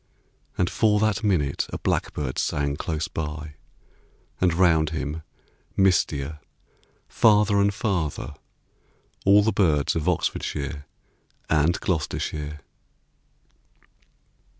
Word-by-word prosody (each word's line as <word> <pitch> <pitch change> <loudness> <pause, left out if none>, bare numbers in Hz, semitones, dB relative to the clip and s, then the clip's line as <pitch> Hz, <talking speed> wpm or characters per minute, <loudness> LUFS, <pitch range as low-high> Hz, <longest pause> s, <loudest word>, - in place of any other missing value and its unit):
And 90 - +2
for 105 +1 +2
that 110 0 +1
minute 80 -10 +1
a - - -3
blackbird 70 -4 -2
sang 70 -1 0
Close 80 +1 -3
by, 75 -1 -5 0.9
and 90 -1 +3
round 80 -3 +3
him, 80 0 -4 0.6
mistier, 75 -6 +1 0.7
Farther 105 -2 +4
and 100 0 +3
farther, 90 -8 -2 0.9
all 100 +1 +6
the 110 - +2
birds 80 -9 +2
Of 80 +2 0
Oxfordshire 75 -4 -2 0.6
and 80 +2 +3
Gloucestershire. 75 -2 -3
80 Hz, 95 wpm, -25 LUFS, 75-95 Hz, 0.9 s, all